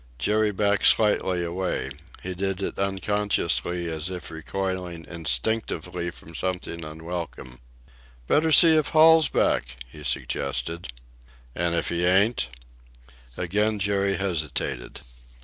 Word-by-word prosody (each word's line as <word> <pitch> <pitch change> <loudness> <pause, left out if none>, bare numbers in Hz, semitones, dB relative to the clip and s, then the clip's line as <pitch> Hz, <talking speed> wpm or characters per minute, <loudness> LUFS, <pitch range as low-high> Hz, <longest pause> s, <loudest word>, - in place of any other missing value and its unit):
Jerry 110 +8 +2
backed 100 0 +2
slightly 95 -4 +3
away. 85 -5 -2 0.3
He 95 - -3
did 95 +1 -2
it - - -4
unconsciously, 95 -3 0
as 80 +1 -3
if 90 -2 -7
recoiling 90 +1 -4
instinctively 85 - -2
from 85 -1 -12
something 90 -1 -3
unwelcome. 80 -5 -7 0.7
"Better 160 +1 +3
see 160 +1 +8
if 155 -2 +2
Hall's 160 0 +6
back," 60 +1 +1
he 75 +5 -12
suggested. 70 +4 -2 0.7
"And 85 -1 0
if 85 - -1
he 85 0 -1
ain't?" 95 - +3 0.9
Again 105 +5 0
Jerry 100 -1 +1
hesitated. 75 -9 -3
90 Hz, 115 wpm, -25 LUFS, 80-100 Hz, 0.9 s, see